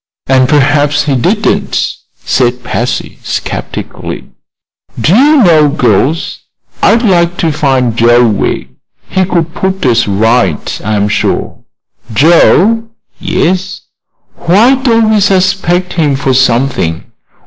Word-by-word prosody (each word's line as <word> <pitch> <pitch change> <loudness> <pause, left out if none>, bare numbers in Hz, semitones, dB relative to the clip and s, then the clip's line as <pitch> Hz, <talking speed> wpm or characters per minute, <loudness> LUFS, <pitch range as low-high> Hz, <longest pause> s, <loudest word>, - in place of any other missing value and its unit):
"And 130 -1 +2
perhaps 145 0 +2
he 145 -2 -1
didn't," 120 - -1 0.3
said 125 -1 0
Patsy, 125 0 -4
skeptically. - - -6 0.7
"Do 170 - +2
you 285 +2 +4
know, 155 -5 +4
girls, 140 - 0 0.4
I'd 230 +2 +3
like 175 -4 +1
to 165 -4 0
find 130 -6 0
Joe 120 +1 +3
Wegg. 105 -2 -2 0.4
He 190 0 +1
could 170 -3 -2
put 190 -3 -3
us 120 -2 +2
right, 110 +5 0
I'm 105 -1 -1
sure." - - -2 0.6
"Joe!" 175 - +3 0.3
"Yes. 185 +2 -2 0.6
Why 210 +10 +3
don't 230 -5 +1
we 215 - +3
suspect 185 -2 0
him 150 -5 0
of 130 -1 +2
something? 125 -10 0
150 Hz, 115 wpm, -10 LUFS, 125-190 Hz, 0.7 s, you